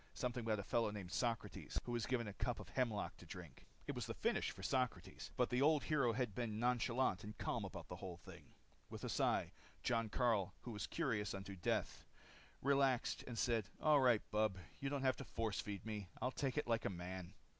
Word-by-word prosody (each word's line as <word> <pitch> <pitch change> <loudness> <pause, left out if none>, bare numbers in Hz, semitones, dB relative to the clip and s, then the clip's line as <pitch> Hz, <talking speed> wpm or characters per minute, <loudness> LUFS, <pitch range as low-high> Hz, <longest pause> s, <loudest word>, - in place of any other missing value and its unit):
Something 125 -2 -1
about 110 -1 +2
a 100 - -3
fellow 115 +2 +2
named 100 -4 -5
Socrates 115 -3 -1
who 120 - -4
was 120 -3 0
given 120 -3 +1
a 100 - -4
cup 120 +3 -1
of - - -8
hemlock 115 -5 0
to - - -12
drink. - - -9 0.2
It - - -2
was - - -3
the - - -3
finis - - +1
for 95 - -6
Socrates. 105 -8 -1
But 125 - +3
the 125 +1 +3
old 150 0 +5
hero 140 -6 +3
had 120 -3 0
been 110 -1 -2
nonchalant 120 -3 +2
and 105 +1 -7
calm - - -1
about - - -6
the - - -6
whole 90 -2 -6
thing. 85 - -13 0.3
With - - -7
a - - -1
sigh, - - +2 0.3
Jon 115 -2 +2
Karyl, 105 -6 +2
who 120 - -6
was 105 -3 -3
curious 110 -12 0
unto 95 0 -6
death, 90 - 0 0.6
relaxed 135 -2 +3
and 120 -2 -4
said, 115 -4 +2
"All 150 -2 +6
right, 125 -5 +5
bub, 105 -2 +2 0.2
you 135 0 -1
don't 140 -1 -1
have 130 -1 +3
to - - -5
force 115 -4 -1
feed 100 -2 -5
me. 105 -3 -3
I'll 125 - 0
take 135 +1 -1
it 150 - +2
like 115 -1 +1
a - - +2
man." 90 +1 -5
115 Hz, 215 wpm, -41 LUFS, 105-125 Hz, 0.6 s, All